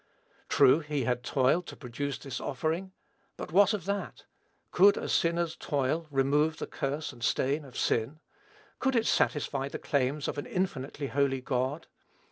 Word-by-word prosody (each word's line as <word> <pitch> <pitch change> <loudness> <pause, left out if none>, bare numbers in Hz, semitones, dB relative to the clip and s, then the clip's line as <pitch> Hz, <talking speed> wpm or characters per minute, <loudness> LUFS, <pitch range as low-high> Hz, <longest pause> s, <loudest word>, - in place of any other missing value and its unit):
True, 130 - +6
he 150 -3 -2
had 125 -1 0
toiled 135 +8 +1
to - - -8
produce 140 +2 -4
this 135 -3 -6
offering; 160 +8 -2 0.5
but - - -7
what 200 +3 +5
of 210 -6 -3
that? 200 0 -4 0.5
Could 200 +3 +6
a - - -3
sinner's 170 -1 +1
toil 145 +3 -1
remove 145 +3 +2
the - - -4
curse 145 +3 -3
and 120 - -15
stain 140 +5 +1
of 135 -3 -11
sin? 120 +7 0 0.6
Could 265 -1 +1
it 225 -1 +2
satisfy 140 -2 +1
the - - -5
claims 140 +1 -1
of - - -3
an - - -6
infinitely 150 -6 -3
holy 135 -1 +1
God? 130 +4 -2
145 Hz, 160 wpm, -29 LUFS, 135-165 Hz, 0.6 s, True